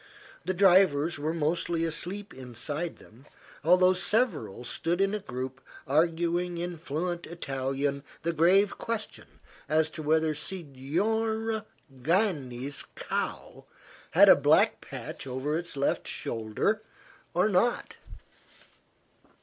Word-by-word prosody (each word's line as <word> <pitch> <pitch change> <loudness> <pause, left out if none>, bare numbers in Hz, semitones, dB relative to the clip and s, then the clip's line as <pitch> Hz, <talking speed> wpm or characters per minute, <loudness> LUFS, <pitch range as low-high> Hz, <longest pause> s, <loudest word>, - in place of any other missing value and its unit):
The 185 - -1
drivers 175 -5 +4
were 155 +2 -1
mostly 165 +1 0
asleep 180 +6 -2
inside 135 +6 -4
them, 125 +7 -18 0.4
although 185 +3 +5
several 200 - 0
stood 170 +7 -1
in 195 +1 +2
a 210 - -1
group 130 -4 -6 0.2
arguing 170 +3 +1
in 175 0 -4
fluent 170 +3 -3
Italian 140 -3 -2 0.2
the 170 +1 0
grave 185 +5 +4
question 230 -2 -4 0.4
as 155 +1 +2
to 155 - -7
whether 155 +1 +2
Signora 205 +9 -2 0.3
Gani's 145 - 0
cow - - -4 0.4
had - - +7
a - - +10
black - - +3
patch - - -7
over 130 +4 -2
its 170 -3 -4
left 140 - 0
shoulder, 115 - -1 0.5
or 180 +4 +4
not. 215 +4 +1
165 Hz, 110 wpm, -28 LUFS, 140-185 Hz, 0.5 s, a